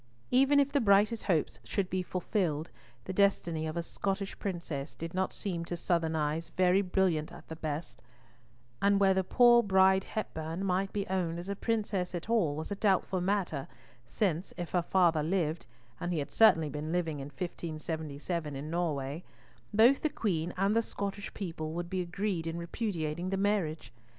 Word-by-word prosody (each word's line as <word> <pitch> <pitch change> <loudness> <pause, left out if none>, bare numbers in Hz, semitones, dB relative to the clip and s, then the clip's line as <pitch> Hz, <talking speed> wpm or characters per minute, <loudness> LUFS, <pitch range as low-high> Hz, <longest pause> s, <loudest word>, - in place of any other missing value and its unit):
Even 275 +3 +5
if 280 0 +2
the 285 -1 +2
brightest 210 +1 +3
hopes 165 -6 0
should 200 -3 -1
be 185 0 -1
fulfilled; 180 -4 -1 0.3
the 190 - -4
destiny 175 -5 +2
of 155 +2 -4
a 170 - -1
Scottish 195 +3 -3
princess 165 -7 -4
did 165 +1 -6
not 190 +1 0
seem 175 -4 -3
to 175 +1 -4
Southern 165 -2 0
eyes 155 +2 -1
very 185 +1 +4
brilliant 180 -5 +1
at - - -12
the 160 - -5
best, 150 -5 -5 0.8
and 200 0 +4
whether 190 -1 +4
poor 240 +5 +6
Bride 190 -2 +4
Hepburn 165 -4 -4
might 190 +1 0
be 200 -1 -2
owned 180 -3 -1
as 175 +3 -6
a 200 - -1
princess 205 -5 -1
at 175 +6 -4
all 175 -11 +2
was 160 +6 -5
a - - 0
doubtful 195 -2 +1
matter, 180 -7 -1 0.4
since, 185 -4 -1
if 175 -2 -5
her 180 - +2
father 170 -3 +3
lived 165 -1 -1 0.3
(and 175 - -2
he 170 - 0
had 145 - -3
certainly 160 -9 +5
been 150 +2 -4
living 165 -4 -1
in 135 - -5
1577 155 -1 -4
in 145 +3 -5
Norway), 155 -2 -2 0.5
both 235 +6 +5
the 310 - +1
Queen 180 - -1
and 195 +3 +2
the 230 - +4
Scottish 200 -2 -4
people 165 -5 -4
would 175 +1 -4
be 185 -1 0
agreed 175 -1 -2
in 165 +1 -3
repudiating 170 -2 -3
the 195 - -1
marriage. 180 - -1
180 Hz, 175 wpm, -31 LUFS, 160-195 Hz, 0.8 s, poor